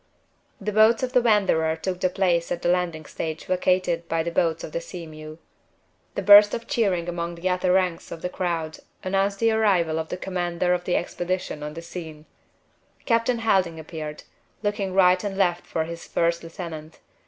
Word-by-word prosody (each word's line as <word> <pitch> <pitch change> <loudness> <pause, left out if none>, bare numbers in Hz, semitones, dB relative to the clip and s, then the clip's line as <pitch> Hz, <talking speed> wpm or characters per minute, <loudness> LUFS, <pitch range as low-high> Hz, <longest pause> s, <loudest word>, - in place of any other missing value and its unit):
The 210 +1 -3
boats 220 +3 +4
of 255 0 -2
the 250 - +5
Wanderer 195 -8 +2
took 180 +3 -4
the 185 - +2
place 175 -3 +1
at 175 0 -3
the - - +2
landing 175 -3 0
stage 160 +1 -5
vacated 180 -2 0
by 165 0 0
the 170 - -3
boats 165 -1 0
of - - -6
the 170 - -3
Sea 170 0 -8
mew. 155 0 -10 0.8
A - - -1
burst 205 0 +8
of 230 - -6
cheering 190 -8 0
among 170 0 -3
the 170 +2 -3
outer 180 0 +1
ranks 180 -2 0
of 165 - -8
the - - 0
crowd 170 -4 -3 0.2
announced 195 +1 0
the 230 +2 +2
arrival 185 -8 +2
of 160 - -4
the - - -4
commander 180 -1 -1
of 175 0 -2
the 180 - +1
expedition 175 -2 -3
on 150 0 -6
the 165 - -7
scene. 160 -3 -8 0.8
Captain 230 +1 +2
Helding 190 -7 +1
appeared, 155 -1 -7 0.4
looking 205 -2 -1
right 185 0 +5
and 200 -2 -3
left 175 -3 +1
for 160 - -1
his 170 +1 -8
first 170 0 0
lieutenant. 165 -2 -8
175 Hz, 190 wpm, -24 LUFS, 165-195 Hz, 0.8 s, burst